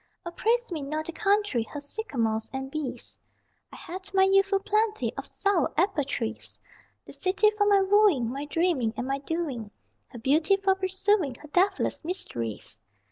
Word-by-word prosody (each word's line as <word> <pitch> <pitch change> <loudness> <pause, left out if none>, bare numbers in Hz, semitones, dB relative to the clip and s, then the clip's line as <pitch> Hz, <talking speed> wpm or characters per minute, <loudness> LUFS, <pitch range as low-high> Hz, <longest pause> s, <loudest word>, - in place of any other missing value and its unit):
O 345 - -4
praise 470 +5 0
me 320 -3 -3
not 305 +3 -3
the - - -4
country, 405 - +1
Her 290 +6 -6
sycamores 245 - -2
and 265 0 -5
bees, 300 -4 -5 0.5
I - - -11
had 375 +3 -7
my 380 - +6
youthful 390 +1 +4
plenty 430 +2 0
of - - -5
sour 395 -7 +1
apple 355 -3 +2
trees! 230 -4 -4 0.5
The - - -11
city 400 +3 +2
for 420 -1 +1
my 400 -1 +5
wooing, 385 - +4
My 275 +3 -4
dreaming 295 -8 0
and 245 - -2
my 275 +1 -1
doing; 280 -8 -3 0.4
Her - - -11
beauty 300 - +3
for 390 -1 +2
pursuing, 380 - +1
Her 300 +4 -13
deathless 380 +4 +1
mysteries. 115 - -5
345 Hz, 165 wpm, -27 LUFS, 275-395 Hz, 0.5 s, my